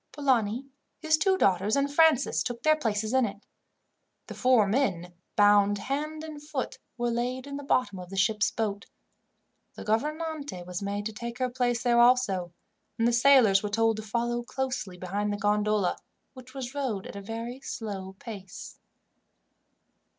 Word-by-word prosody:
Polani, 255 Hz, -4 st, +1 dB, 0.3 s
his 315 Hz, -1 st, +2 dB
two 380 Hz, +4 st, +2 dB
daughters, 195 Hz, -, +2 dB
and 280 Hz, 0 st, 0 dB
Francis 310 Hz, -4 st, +4 dB
took 240 Hz, -1 st, -4 dB
their 310 Hz, 0 st, +5 dB
places 220 Hz, -5 st, -1 dB
in 260 Hz, 0 st, +4 dB
it. 205 Hz, -2 st, -4 dB, 0.8 s
The -, -, -8 dB
four 250 Hz, -4 st, +4 dB
men, 190 Hz, -7 st, 0 dB, 0.2 s
bound 205 Hz, 0 st, +5 dB
hand 305 Hz, +7 st, -3 dB
and 310 Hz, -2 st, -8 dB
foot, 295 Hz, -3 st, -4 dB, 0.2 s
were 240 Hz, 0 st, 0 dB
laid 250 Hz, +2 st, -2 dB
in 280 Hz, 0 st, -6 dB
the 285 Hz, -, -7 dB
bottom 250 Hz, -8 st, 0 dB
of 180 Hz, -1 st, -9 dB
the 195 Hz, -, -7 dB
ship's 215 Hz, +2 st, +2 dB
boat; 205 Hz, -2 st, -3 dB, 0.9 s
the -, -, -8 dB
gouvernante 295 Hz, -, -2 dB
was 180 Hz, +1 st, -5 dB
made 200 Hz, +1 st, -3 dB
to 220 Hz, -, -3 dB
take 235 Hz, +3 st, -6 dB
her 255 Hz, -1 st, -1 dB
place 245 Hz, -1 st, 0 dB
there 240 Hz, -1 st, +3 dB
also, 235 Hz, -8 st, +3 dB, 0.5 s
and 230 Hz, 0 st, +2 dB
the 240 Hz, -, +2 dB
sailors 240 Hz, -6 st, +6 dB
were 210 Hz, -, -3 dB
told 225 Hz, +1 st, +2 dB
to -, -, -4 dB
follow 235 Hz, +2 st, -1 dB
closely 250 Hz, -7 st, -4 dB
behind 200 Hz, +3 st, -2 dB
the 205 Hz, -, -2 dB
gondola, 210 Hz, -2 st, +1 dB, 0.4 s
which 255 Hz, 0 st, -13 dB
was 265 Hz, -1 st, -5 dB
rowed 255 Hz, -9 st, -2 dB
at -, -, -9 dB
a 200 Hz, -, -6 dB
very 230 Hz, +5 st, -6 dB
slow 195 Hz, -7 st, -6 dB
pace. 200 Hz, -3 st, -9 dB
235 Hz, 165 wpm, -28 LUFS, 205-265 Hz, 0.9 s, sailors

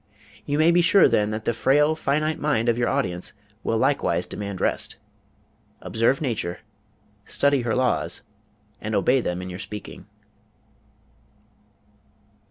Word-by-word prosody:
You 145 Hz, 0 st, 0 dB
may 160 Hz, +2 st, +5 dB
be 175 Hz, +1 st, +4 dB
sure, 175 Hz, +3 st, +6 dB
then, 105 Hz, 0 st, +2 dB
that 110 Hz, 0 st, -4 dB
the 120 Hz, -, +1 dB
frail 145 Hz, +6 st, +3 dB
finite 155 Hz, +1 st, 0 dB
mind 145 Hz, -6 st, 0 dB
of 115 Hz, -, +3 dB
your 120 Hz, -, +1 dB
audience 105 Hz, -8 st, -2 dB, 0.3 s
will 115 Hz, -, 0 dB
likewise -, -, +1 dB
demand 100 Hz, -2 st, -6 dB
rest. -, -, -1 dB, 0.8 s
Observe 115 Hz, +5 st, +1 dB
nature, 110 Hz, -, -2 dB, 0.6 s
study 140 Hz, +4 st, +2 dB
her 120 Hz, -1 st, -1 dB
laws, 130 Hz, -1 st, 0 dB, 0.6 s
and 110 Hz, 0 st, -3 dB
obey 125 Hz, +6 st, +3 dB
them 90 Hz, -4 st, -3 dB
in 90 Hz, -, -6 dB
your 90 Hz, -, -7 dB
speaking. 105 Hz, +1 st, -8 dB
120 Hz, 135 wpm, -24 LUFS, 105-145 Hz, 0.8 s, sure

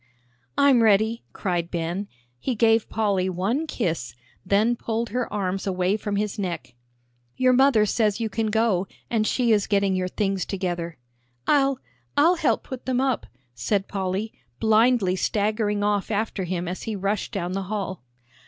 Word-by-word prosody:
"I'm 275 Hz, -4 st, +5 dB
ready," 220 Hz, +2 st, +3 dB
cried 175 Hz, -4 st, -2 dB
Ben. 175 Hz, +4 st, -3 dB, 0.3 s
He 245 Hz, -, -2 dB
gave 225 Hz, 0 st, +3 dB
Polly 200 Hz, -4 st, +1 dB
one 205 Hz, -, -1 dB
kiss, 160 Hz, -, -2 dB, 0.3 s
then 210 Hz, +5 st, +2 dB
pulled 230 Hz, 0 st, -2 dB
her 245 Hz, +2 st, -2 dB
arms 195 Hz, -1 st, -2 dB
away 185 Hz, +1 st, +1 dB
from 210 Hz, -1 st, -3 dB
his 210 Hz, +1 st, -2 dB
neck. 170 Hz, -10 st, -4 dB, 0.6 s
"Your 255 Hz, 0 st, +4 dB
mother 255 Hz, -4 st, +5 dB
says 210 Hz, 0 st, +1 dB
you 225 Hz, -, 0 dB
can 220 Hz, +1 st, -1 dB
go, 215 Hz, -4 st, +1 dB, 0.2 s
and 220 Hz, -2 st, +2 dB
she 245 Hz, -3 st, +2 dB
is 210 Hz, -2 st, +3 dB
getting 200 Hz, -2 st, +2 dB
your 185 Hz, 0 st, 0 dB
things 195 Hz, -1 st, -1 dB
together." 175 Hz, -4 st, -3 dB, 0.5 s
"I'll 275 Hz, -2 st, +3 dB, 0.4 s
I'll 335 Hz, +5 st, +5 dB
help -, -, +1 dB
put 260 Hz, -2 st, -8 dB
them 255 Hz, -1 st, +1 dB
up," 265 Hz, -2 st, 0 dB, 0.3 s
said 190 Hz, -, -1 dB
Polly, 195 Hz, +2 st, -2 dB, 0.3 s
blindly 220 Hz, -3 st, +3 dB
staggering 210 Hz, +1 st, 0 dB
off 205 Hz, -1 st, 0 dB
after 210 Hz, -3 st, -1 dB
him 175 Hz, 0 st, -3 dB
as 180 Hz, +1 st, -4 dB
he 220 Hz, -, -3 dB
rushed 200 Hz, +1 st, -2 dB
down 180 Hz, -3 st, -3 dB
the 195 Hz, +1 st, -2 dB
hall. 195 Hz, -, -3 dB
205 Hz, 160 wpm, -24 LUFS, 185-225 Hz, 0.6 s, I'm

